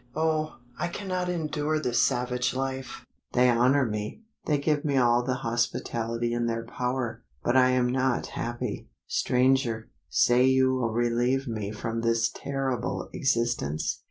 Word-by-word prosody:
Oh! 155 0 0 0.2
I - - 0
cannot 180 0 -3
endure 155 -2 -1
this 120 -5 +1
savage 125 0 0
life. 130 -1 -4 0.3
They 125 0 +5
honour 130 +4 +4
me 105 - -4 0.2
they 150 - +3
give 145 +1 0
me 140 -3 +1
all 120 -1 +4
the 130 +1 -1
hospitality 120 0 -1
in 120 0 0
their 115 0 -2
power 125 -1 -3 0.2
but 120 - +1
I 130 -1 +6
am 125 -1 +3
not 130 0 +1
happy. 120 0 -4 0.2
Stranger, 125 -3 +1 0.2
say 120 +1 +4
you 130 0 +4
will 125 -3 0
relieve 120 +3 +1
me 110 -3 -3
from 115 +2 -3
this 115 0 +2
terrible 135 -3 -3
existence? 120 - 0
125 Hz, 145 wpm, -27 LUFS, 120-135 Hz, 0.3 s, I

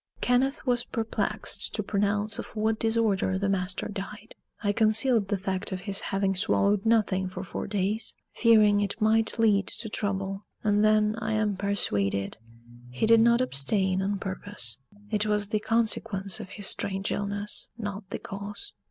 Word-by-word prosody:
Kenneth 265 +4 +1
was 245 -1 +2
perplexed 225 -3 -2
to 210 - -1
pronounce 205 +1 +1
of - - -5
what 220 +1 0
disorder 220 -4 +1
the 200 +1 -1
master 185 -1 -1
died. 205 +2 -7 0.3
I 205 - +2
concealed 220 0 +3
the 200 - 0
fact 190 +1 -3
of 185 -1 -4
his 200 0 -1
having 195 0 0
swallowed 200 +1 +2
nothing 200 -4 +2
for 185 0 -6
four - - -5
days, 205 +2 -2 0.2
fearing 215 -3 +5
it 205 +2 -2
might 220 +1 +2
lead 210 -3 +3
to 225 -1 -2
trouble; 195 -1 -3 0.2
and 210 0 +3
then, 215 0 +3
I 220 -1 -2
am 215 -2 +1
persuaded, 100 - -1 0.5
he 125 - -1
did 230 +1 +6
not 235 +1 +4
abstain 190 - +1
on 200 +1 -1
purpose: 185 - -4 0.3
it 210 0 +1
was 210 -1 0
the 215 - +1
consequence 215 -4 0
of - - -8
his 205 - -6
strange 195 0 0
illness, 205 +1 -2
not 205 -3 -6
the - - -3
cause. 205 - -5
205 Hz, 160 wpm, -27 LUFS, 195-220 Hz, 0.5 s, did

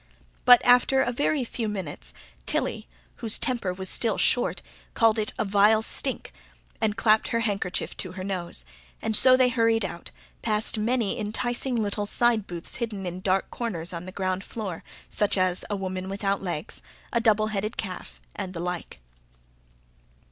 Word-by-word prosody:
But 245 -1 +8
after 250 +2 +5
a 245 - -1
very 285 +2 0
few 230 -2 -3
minutes 160 - -5 0.4
Tilly, - - 0 0.3
whose 225 -2 +4
temper 240 -8 -1
was 190 +1 -4
still 225 +2 0
short, 245 - +2 0.3
called 225 -1 +4
it 215 - 0
a - - 0
"vile 210 +2 +4
stink" - - -3 0.5
and 220 -1 0
clapped 215 -1 +3
her 230 -1 0
handkerchief 200 -5 -2
to 185 -2 -4
her 185 0 -6
nose, 180 - -3 0.3
and 220 -1 0
so 255 +3 +8
they 255 -1 +4
hurried 230 -3 +2
out, 170 -2 -7 0.3
past 215 0 +1
many 230 -1 0
enticing 240 +4 -1
little 205 -2 -1
side 230 -2 +2
booths 170 -1 -4
hidden 215 -5 -4
in 180 0 -4
dark 190 0 0
corners 180 -8 -3
on 170 +1 -5
the - - -6
ground 185 0 -2
floor, 200 -8 -6 0.2
such 205 -1 0
as 185 -1 +1
a 205 - -1
woman 185 -1 -4
without 195 0 -1
legs, 175 -5 -5 0.3
a 235 - +2
double 215 -1 +3
headed 210 +2 -2
calf, 180 - -6 0.2
and 185 -1 -5
the - - -4
like. 180 - -5
210 Hz, 165 wpm, -26 LUFS, 185-230 Hz, 0.5 s, But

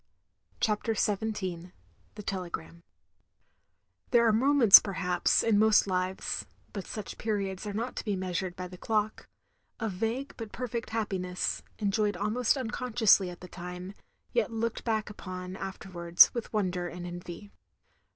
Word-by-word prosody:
CHAPTER 220 +1 0
XVII 190 -5 -2 0.4
THE 210 - -8
TELEGRAM 170 - -5 1.3
There 235 -1 +5
are 225 - +4
moments, 250 -2 +8
perhaps, 180 -3 +1
in 220 -3 +3
most 220 0 +5
Kves 185 -1 -2 0.3
(but 200 -3 -5
such 210 -3 -6
periods 200 -2 -2
are 205 - -4
not 230 +5 -3
to - - -2
be 205 -2 0
meastired 185 -1 -3
by 180 -1 -5
the 180 0 -12
clock), 215 -1 -1 0.5
of 225 -2 -2
vague 230 +9 -2
but 225 -3 -7
perfect 235 -2 -4
happiness; 190 -5 -2 0.2
enjoyed 205 0 0
almost 225 +5 +1
unconsciously 235 -6 +3
at 175 - -10
the 180 - -8
time, 180 +2 -7 0.4
yet 480 - +1
looked 230 0 -2
back 220 -2 -1
upon 185 -2 -7
afterwards 180 -3 +3
with 235 -2 -4
wonder 185 -4 -1
and 175 0 -7
envy. 175 +3 -8
200 Hz, 140 wpm, -29 LUFS, 180-220 Hz, 1.3 s, moments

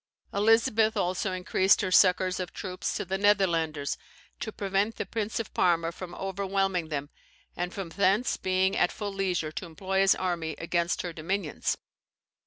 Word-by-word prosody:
Elizabeth 225 +1 +3
also 185 +2 0
increased 185 +3 +3
her 190 -2 -1
succours 185 0 +4
of 180 -1 -4
troops 185 -2 -4
to - - -3
the 190 +1 -2
Netherlanders, 165 -8 +2 0.4
to 220 - -4
prevent 200 +2 0
the - - -3
Prince 220 +2 -3
of 225 - -5
Parma 170 -2 +2
from 175 0 -8
overwhelming 195 -2 -1
them, 145 -1 -4 0.4
and 180 +1 -2
from 195 -4 -5
thence 200 +6 +2
being 190 +1 +1
at 175 - +2
full 205 -2 -5
leisure 180 -5 -1
to 155 - -5
employ 190 +4 -2
his 195 0 +5
army 170 -4 -2
against 170 +1 -1
her 175 -2 -4
dominions. 170 +1 -2
185 Hz, 160 wpm, -28 LUFS, 175-200 Hz, 0.4 s, his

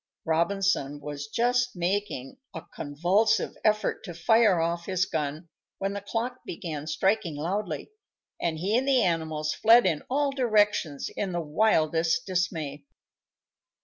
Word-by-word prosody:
Robinson 165 -3 +1
was 145 0 -6
just 245 +6 +1
making 180 - -2 0.2
a 160 - -5
convulsive 175 +10 +1
effort 215 -1 +1
to 175 -4 -7
fire 210 +1 +4
off 170 +1 -1
his 185 -1 +1
gun, 155 0 -4 0.3
when 195 +1 -2
the 200 - -4
clock 235 +5 -3
began 155 -3 -6
striking 190 0 0
loudly, 190 - -3 0.5
and 165 -2 -1
he 195 +7 0
and 265 - -4
the 265 -3 +4
animals 160 -3 -1
fled 235 +2 +6
in 155 -3 +1
all 280 +2 +1
directions 210 - +1
in 195 -3 -2
the 175 - -1
wildest 160 -1 +2
dismay. 160 -6 -2
175 Hz, 135 wpm, -27 LUFS, 155-215 Hz, 0.5 s, fled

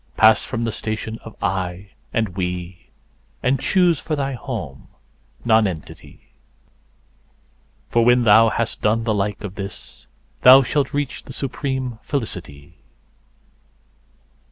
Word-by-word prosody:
Pass 110 0 +6
from 115 -2 -3
the 115 - -1
station 110 0 -4
of 115 - -11
"I" 95 +1 -3 0.2
and 110 -2 0
"We," 90 -1 -5 0.5
and 130 +1 +2
choose 175 -1 +2
for 155 - -3
thy 140 -1 -2
home 120 - -6 0.6
Nonentity, 105 -8 -1 1.6
For 115 - +2
when 120 +1 +4
thou 115 +1 +6
has 115 0 -2
done 110 +2 0
the 110 -1 0
like 105 +1 -2
of 100 -3 -5
this, 100 -1 -9 0.3
thou 130 +2 +9
shalt 135 +2 0
reach 145 -2 -3
the - - -8
supreme 130 -3 -3
Felicity. 85 - -5
110 Hz, 120 wpm, -21 LUFS, 100-130 Hz, 1.6 s, thou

